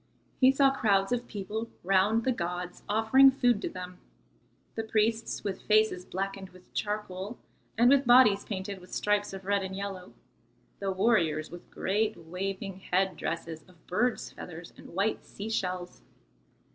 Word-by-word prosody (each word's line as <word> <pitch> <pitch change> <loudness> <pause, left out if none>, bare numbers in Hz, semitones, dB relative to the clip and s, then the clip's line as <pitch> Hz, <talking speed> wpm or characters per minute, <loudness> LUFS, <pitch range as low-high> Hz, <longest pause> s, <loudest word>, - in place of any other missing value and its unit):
He 260 0 +7
saw 275 0 +4
crowds 200 -6 +2
of 245 0 -1
people 215 +2 -5
round 195 +4 +3
the 260 - +2
gods 180 -3 -4
offering 225 +6 +6
food 245 -5 +2
to - - -2
them; 180 0 -8 0.7
the 225 - -2
priests 220 +1 0
with 200 -2 -3
faces 215 -4 +2
blackened 195 0 -4
with 185 0 -19
charcoal 210 0 -3 0.4
and 235 +2 +5
with 275 0 +5
bodies 240 -5 +6
painted 195 -1 -5
with 180 0 -16
stripes 205 0 +1
of 195 -1 -8
red 200 0 +1
and 190 0 -5
yellow, 195 -2 -6 0.7
the 195 -1 -1
warriors 185 -7 +1
with 175 0 -11
great 215 +3 -1
waving 190 +3 -5
head 190 0 0
dresses 165 -1 -4
of 180 -3 -22
birds' 230 +6 0
feathers 170 0 -10
and - - -13
white 200 +3 0
sea 205 +2 -7
shells. 180 -4 -3
200 Hz, 155 wpm, -29 LUFS, 185-220 Hz, 0.7 s, He